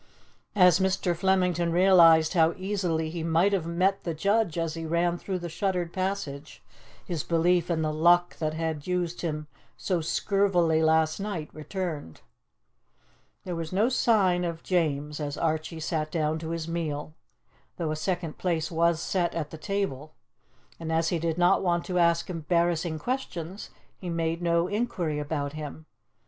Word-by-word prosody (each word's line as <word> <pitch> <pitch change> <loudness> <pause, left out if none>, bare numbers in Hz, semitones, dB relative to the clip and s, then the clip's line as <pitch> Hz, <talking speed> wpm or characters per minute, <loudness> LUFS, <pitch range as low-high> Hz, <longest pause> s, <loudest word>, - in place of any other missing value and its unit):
As 180 -4 +6
Mr. 190 -2 +1
Flemington 180 -2 +1
realized 170 -3 +6
how 165 -2 +4
easily 185 -5 -1
he 170 0 -4
might 165 +5 +2
have 175 -4 0
met 185 +3 +1
the 165 -2 -3
judge 200 +1 +1
as 165 -2 -1
he 165 0 -5
ran 170 +2 +1
through 190 -2 -3
the 175 -1 -5
shuttered 175 0 -2
passage, 185 -7 -4 0.4
his 170 -4 -2
belief 175 +2 +2
in 160 -2 0
the 155 0 -1
luck 175 +3 +4
that 155 -1 -1
had 160 -2 -3
used 175 -1 -1
him 155 -3 -3 0.3
so 180 -3 -1
scurvily 175 -2 +2
last 160 +1 +2
night 195 -7 -4
returned. 155 - -5 1.2
There 180 -2 -4
was 165 -1 -5
no 205 +6 +2
sign 200 -8 +3
of 170 -1 -4
James 150 -4 -1
as 145 -1 -4
Archie 160 0 -2
sat 155 -1 -2
down 155 -1 0
to 160 0 -6
his 165 -1 -3
meal, 155 -3 -3 0.6
though 165 -3 -2
a - - -1
second 170 0 -3
place 165 -3 -1
was 170 0 +2
set 175 0 -1
at 155 -3 -3
the 160 - -7
table, 155 -7 -3 0.6
and 165 -1 -4
as 160 0 +1
he 170 - 0
did 165 0 -1
not 175 0 +4
want 175 -2 0
to 180 -2 -1
ask 170 0 +3
embarrassing 170 -1 0
questions, 190 - -4 0.3
he 180 - -6
made 165 0 -1
no 170 0 +2
inquiry 190 -8 -2
about 145 -1 -3
him. 155 0 -7
170 Hz, 160 wpm, -27 LUFS, 160-180 Hz, 1.2 s, As